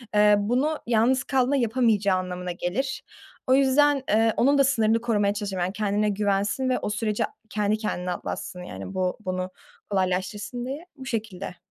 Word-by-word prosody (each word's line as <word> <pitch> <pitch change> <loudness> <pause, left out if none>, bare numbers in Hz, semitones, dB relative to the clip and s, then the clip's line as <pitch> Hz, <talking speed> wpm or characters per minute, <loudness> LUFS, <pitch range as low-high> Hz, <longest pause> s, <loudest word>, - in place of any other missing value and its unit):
eee, 210 0 +6
bunu 260 +9 0
yalnız 240 +3 +3
kaldığında 265 0 +1
yapamayacağı 220 -6 +2
anlamına 180 0 -4
gelir. 185 +10 -3 0.4
O 255 - +4
yüzden, 275 +1 +4
eee, 225 +1 +3
onun 280 +3 +4
da 275 - +6
sınırını 230 -4 +2
korumaya 210 -4 +1
çalışırım. 200 -3 -3
Yani, 180 +2 -1
kendine 210 0 0
güvensin 205 +5 0
ve 255 - +1
o - - -3
süreci 210 0 -1 0.3
kendi 210 0 0
kendine 180 -4 -3
atlatsın, 180 0 -5
yani 190 +1 -7
bu 185 -1 -1
bunu 185 0 -2 0.4
kolaylaştırsın 195 +5 -1
diye. 285 +6 -5
Bu 265 - -10
şekilde. 215 -7 -4
215 Hz, 160 wpm, -25 LUFS, 195-255 Hz, 0.4 s, eee